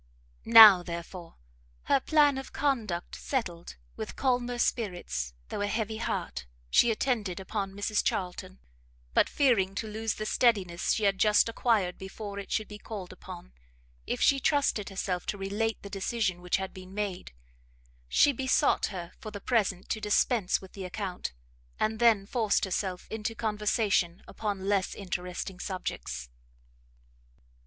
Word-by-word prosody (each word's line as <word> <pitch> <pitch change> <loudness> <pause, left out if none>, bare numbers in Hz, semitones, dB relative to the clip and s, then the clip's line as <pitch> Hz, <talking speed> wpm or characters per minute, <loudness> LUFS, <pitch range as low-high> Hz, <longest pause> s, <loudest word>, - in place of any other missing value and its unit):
Now, 220 -5 +10
therefore, 170 0 -7 0.5
her - - +3
plan 290 -1 +3
of 270 - -9
conduct 230 -12 -1
settled, 180 -11 -4 0.2
with - - -6
calmer 245 -2 0
spirits, 175 - -2
though - - -4
a 205 - 0
heavy 220 +1 -2
heart, 70 - -3 0.2
she 240 - +5
attended 220 -5 -1
upon 195 0 -4
Mrs 205 +1 0
Charlton; 185 0 -3 0.6
but - - +4
fearing 220 -9 +2
to 220 - -2
lose 220 0 -3
the 215 - -4
steadiness 200 -8 +2
she 220 - -1
had 195 -1 +2
just 210 +1 +5
acquired 225 -6 +1
before 200 +1 -7
it 200 - -8
should 215 - 0
be 210 0 -10
called 200 -5 -7
upon, - - -11 0.5
if - - -2
she 275 - +4
trusted 280 -8 +1
herself 190 -2 -3
to 205 - -2
relate 205 +3 -2
the - - -7
decision 195 -2 -1
which 180 0 +1
had 190 0 -5
been 185 +1 -11
made, 205 -3 -3 0.8
she 290 - +5
besought 260 0 +2
her 175 -4 -6
for 225 - -7
the 205 -1 -7
present 200 -5 0
to 220 - -2
dispense 210 -1 +2
with 190 - -13
the 195 - -7
account, 185 - -4 0.5
and 215 0 0
then 225 -4 +4
forced 220 -2 +1
herself 185 -1 -3
into 220 +1 -3
conversation 210 -5 0
upon 200 -3 -4
less 200 -2 +1
interesting 180 -1 -5
subjects. 180 - -5
205 Hz, 145 wpm, -29 LUFS, 185-225 Hz, 0.8 s, Now